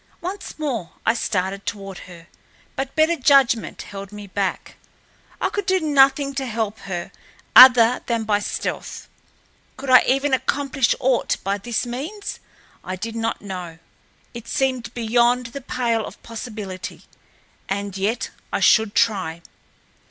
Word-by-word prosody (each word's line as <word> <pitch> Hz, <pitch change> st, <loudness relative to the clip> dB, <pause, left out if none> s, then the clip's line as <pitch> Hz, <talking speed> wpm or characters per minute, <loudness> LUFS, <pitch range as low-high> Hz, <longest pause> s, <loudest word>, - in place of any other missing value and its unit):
Once 375 Hz, +3 st, -6 dB
more 255 Hz, -, -3 dB
I 225 Hz, -, +4 dB
started 195 Hz, -3 st, -2 dB
toward 195 Hz, -3 st, -5 dB
her, 170 Hz, -2 st, -12 dB, 0.5 s
but 270 Hz, 0 st, -4 dB
better 315 Hz, +2 st, +3 dB
judgment 270 Hz, -6 st, +3 dB
held 195 Hz, 0 st, -9 dB
me 210 Hz, 0 st, -9 dB
back—I 195 Hz, -1 st, -5 dB
could 405 Hz, -2 st, -4 dB
do 375 Hz, -1 st, +3 dB
nothing 275 Hz, -2 st, +3 dB
to 270 Hz, -1 st, -3 dB
help 220 Hz, -2 st, -3 dB
her 175 Hz, -2 st, -4 dB, 0.4 s
other 250 Hz, -2 st, +9 dB
than 230 Hz, -2 st, 0 dB
by 210 Hz, -1 st, +1 dB
stealth. 205 Hz, -, -4 dB, 0.7 s
Could 265 Hz, 0 st, -3 dB
I 255 Hz, -, +9 dB
even 275 Hz, +1 st, +2 dB
accomplish 275 Hz, -1 st, +1 dB
aught 255 Hz, -1 st, +1 dB
by 200 Hz, +1 st, -1 dB
this 240 Hz, +4 st, -2 dB
means? 300 Hz, -, -5 dB, 0.4 s
I 185 Hz, -, -4 dB
did 225 Hz, +4 st, -6 dB
not 225 Hz, -1 st, -2 dB
know. 180 Hz, -4 st, -6 dB, 0.6 s
It 235 Hz, -1 st, -9 dB
seemed 260 Hz, -3 st, -1 dB
beyond 240 Hz, +2 st, +2 dB
the 280 Hz, -, -6 dB
pale 235 Hz, -3 st, -1 dB
of -, -, -13 dB
possibility, 215 Hz, -5 st, -7 dB, 0.7 s
and 200 Hz, 0 st, -3 dB
yet 215 Hz, +4 st, -1 dB, 0.2 s
I -, -, 0 dB
should 220 Hz, -1 st, +4 dB
try. 185 Hz, -8 st, +1 dB
230 Hz, 135 wpm, -22 LUFS, 200-270 Hz, 0.7 s, other